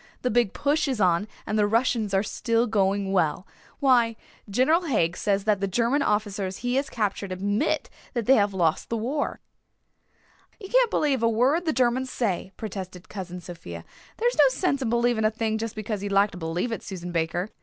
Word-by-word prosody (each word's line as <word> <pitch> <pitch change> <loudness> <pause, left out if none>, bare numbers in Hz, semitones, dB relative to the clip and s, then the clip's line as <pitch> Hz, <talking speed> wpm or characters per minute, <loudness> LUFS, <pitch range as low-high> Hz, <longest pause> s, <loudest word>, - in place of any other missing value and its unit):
The 250 - +1
Big 235 -3 +2
Push 290 +2 0
is 260 -5 -1
on 180 +1 +2 0.2
and 215 0 -1
the 205 - +4
Russians 225 -1 +1
are 195 0 +2
still 230 +2 0
going 200 -3 +1
well. 175 -1 +1 0.3
Why, 245 -5 +4 0.3
General 265 - +3
Haig 175 - +1
says 200 0 0
that 210 -2 +2
the 195 - +1
German 235 +8 +1
officers 205 -5 -1
he 245 - +1
has 280 - -1
captured 200 -3 -2
admit 205 +9 0 0.3
that 235 -3 -1
they 265 - +6
have 205 -5 +3
lost 170 -5 0
the 230 - -1
war." 265 +7 -2 1.2
"You 390 -3 -9
can't - - +4
believe 280 - +1
a 230 - +3
word 260 +10 +2
the 320 - +2
Germans 255 -1 +1
say," 195 -7 -2
protested 185 -4 -7
Cousin 180 -3 -6
Sophia. 90 - -9 0.3
"There 470 - +1
is 485 - 0
no 285 -2 +7
sense 280 +1 0
in 250 - -1
believing 235 -1 +2
a 215 - +4
thing 220 0 -2
just 225 -1 -4
because 215 -1 -4
you'd 205 0 -4
like 200 +1 +4
to - - -9
believe 170 +8 -2
it, 225 - -3
Susan 180 -2 -7
Baker. 175 +4 -1
215 Hz, 200 wpm, -25 LUFS, 195-250 Hz, 1.2 s, no